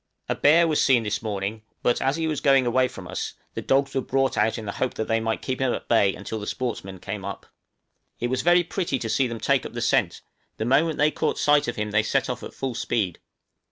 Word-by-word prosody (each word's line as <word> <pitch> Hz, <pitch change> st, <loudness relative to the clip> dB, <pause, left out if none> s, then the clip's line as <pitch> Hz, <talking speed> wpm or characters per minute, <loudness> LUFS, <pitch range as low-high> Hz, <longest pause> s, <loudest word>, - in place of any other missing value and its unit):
_ -, -, -55 dB, 0.2 s
A -, -, +1 dB
bear 165 Hz, +3 st, +5 dB
was 155 Hz, -2 st, +2 dB
seen 125 Hz, -4 st, +4 dB
this 105 Hz, -1 st, -2 dB
morning; 105 Hz, 0 st, -3 dB, 0.2 s
but 120 Hz, -, +2 dB
as 135 Hz, +2 st, +1 dB
he 165 Hz, 0 st, -1 dB
was 155 Hz, -2 st, -2 dB
going 135 Hz, -2 st, +4 dB
away 130 Hz, +2 st, +3 dB
from -, -, -10 dB
us, -, -, -4 dB, 0.2 s
the -, -, -4 dB
dogs 135 Hz, +1 st, +1 dB
were 135 Hz, -, 0 dB
brought 135 Hz, +1 st, 0 dB
out 110 Hz, +2 st, +1 dB
in 110 Hz, -, -6 dB
the 100 Hz, -, -3 dB
hope 130 Hz, +5 st, -2 dB
that 110 Hz, -, -3 dB
they 115 Hz, 0 st, +2 dB
might 110 Hz, 0 st, -2 dB
keep 130 Hz, 0 st, -3 dB
him 130 Hz, -2 st, +2 dB
at -, -, -8 dB
bay 100 Hz, -4 st, +3 dB
until 110 Hz, +2 st, -5 dB
the 105 Hz, -, -7 dB
sportsmen 105 Hz, -6 st, -4 dB
came 100 Hz, +1 st, -6 dB
up. 100 Hz, -, -6 dB, 0.7 s
It 120 Hz, +1 st, -2 dB
was 130 Hz, -, 0 dB
very 175 Hz, +1 st, +4 dB
pretty 170 Hz, -4 st, -2 dB
to 115 Hz, -, -4 dB
see 130 Hz, +3 st, +2 dB
them 115 Hz, -1 st, -5 dB
take -, -, +2 dB
up -, -, -8 dB
the -, -, -4 dB
scent, -, -, +1 dB, 0.4 s
the 110 Hz, -, -2 dB
moment 150 Hz, +6 st, +2 dB
they 150 Hz, +1 st, +3 dB
caught 155 Hz, -, -1 dB
sight 145 Hz, 0 st, +3 dB
of 120 Hz, -, -2 dB
him 105 Hz, 0 st, -3 dB
they 105 Hz, +1 st, +3 dB
set 110 Hz, -, 0 dB
off -, -, -6 dB
at -, -, -9 dB
full 135 Hz, -2 st, -3 dB
speed. 100 Hz, -6 st, -1 dB
125 Hz, 260 wpm, -25 LUFS, 110-135 Hz, 0.7 s, bear